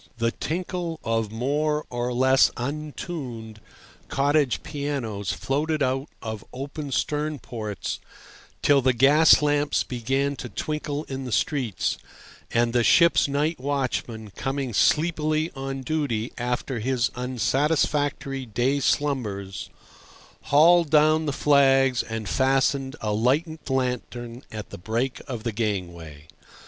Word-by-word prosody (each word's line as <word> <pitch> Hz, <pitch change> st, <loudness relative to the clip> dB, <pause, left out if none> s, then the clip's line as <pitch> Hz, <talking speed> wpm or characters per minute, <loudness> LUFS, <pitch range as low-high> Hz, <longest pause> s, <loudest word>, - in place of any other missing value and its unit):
The 115 Hz, 0 st, +1 dB
tinkle 170 Hz, +1 st, -3 dB
of 115 Hz, -2 st, -1 dB
more 150 Hz, +6 st, 0 dB
or 120 Hz, 0 st, -2 dB
less 130 Hz, +2 st, +4 dB
untuned 130 Hz, -5 st, -5 dB, 0.5 s
cottage 145 Hz, -1 st, +1 dB
pianos 140 Hz, -, -3 dB
floated 150 Hz, +2 st, -1 dB
out 135 Hz, +2 st, -1 dB
of 110 Hz, -2 st, -5 dB
open 140 Hz, +2 st, -6 dB
stern 150 Hz, +3 st, -1 dB
ports 110 Hz, -, -5 dB, 0.6 s
till 140 Hz, -1 st, +5 dB
the 130 Hz, 0 st, +3 dB
gas 145 Hz, +6 st, +6 dB
lamps 145 Hz, 0 st, +2 dB
began 135 Hz, +3 st, -1 dB
to 120 Hz, -, -6 dB
twinkle 150 Hz, +5 st, -3 dB
in 135 Hz, -2 st, -6 dB
the 125 Hz, -, -5 dB
streets, 130 Hz, -, 0 dB, 0.5 s
and 115 Hz, 0 st, +1 dB
the 120 Hz, -1 st, +3 dB
ship's 170 Hz, +6 st, +5 dB
night 145 Hz, +3 st, 0 dB
watchman, 125 Hz, -5 st, -2 dB
coming 135 Hz, +2 st, -3 dB
sleepily 155 Hz, +4 st, +2 dB
on 135 Hz, 0 st, -4 dB
duty 130 Hz, -6 st, -1 dB
after 125 Hz, +1 st, -2 dB
his 120 Hz, +1 st, 0 dB
unsatisfactory 135 Hz, +2 st, 0 dB
day 120 Hz, +6 st, +1 dB
slumbers, 110 Hz, -10 st, -1 dB, 0.8 s
hauled 165 Hz, +3 st, +5 dB
down 155 Hz, +1 st, +4 dB
the -, -, +1 dB
flags 135 Hz, -3 st, +4 dB
and 110 Hz, -2 st, -5 dB
fastened 135 Hz, +1 st, +1 dB
a 105 Hz, -2 st, -1 dB
lighted 145 Hz, -, 0 dB
lantern 125 Hz, -2 st, -2 dB
at 105 Hz, -1 st, -7 dB
the -, -, -8 dB
break 115 Hz, +7 st, -2 dB
of 120 Hz, -5 st, -5 dB
the 115 Hz, -, -1 dB
gangway. 85 Hz, -9 st, -4 dB
135 Hz, 120 wpm, -25 LUFS, 120-150 Hz, 0.8 s, gas